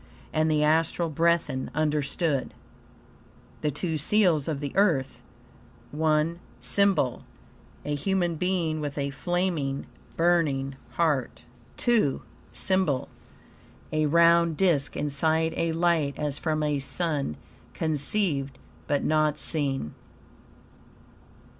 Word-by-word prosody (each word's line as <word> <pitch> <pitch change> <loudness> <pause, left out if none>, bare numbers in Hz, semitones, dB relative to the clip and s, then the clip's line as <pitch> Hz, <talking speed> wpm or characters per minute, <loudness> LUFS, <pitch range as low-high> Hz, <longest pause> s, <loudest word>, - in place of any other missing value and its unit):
And 155 0 +2
the 150 -1 +2
Astral 165 +2 +2
Brethren 165 -4 +1
understood. 150 -1 0 1.1
THE 150 - +1
TWO 160 +3 -2
SEALS 175 -4 +3
OF 155 -4 -2
THE 145 -1 -4
EARTH 165 -10 +1 0.7
I 155 +1 +2 0.3
SYMBOL 195 -11 +1 0.6
A 150 - -2
human 175 +3 0
being, 165 -2 -1
with 145 -1 -4
a 140 -1 -1
flaming, 160 -3 -2 0.3
burning 150 -6 +1 0.2
heart. 150 -7 0 0.4
II 220 - +3 0.3
SYMBOL 185 -9 0 0.8
A 155 0 +1
round 170 0 +4
disk 165 -7 +1
inside 160 +3 +1
a 165 0 0
light, 165 -4 +1
as 145 -1 -2
from 155 -2 -1
a 150 -1 0
sun, 140 - -1 0.4
conceived, 150 -3 0 0.3
but 145 -1 0
not 155 -1 +2
seen. 135 - 0
155 Hz, 105 wpm, -26 LUFS, 145-170 Hz, 1.1 s, round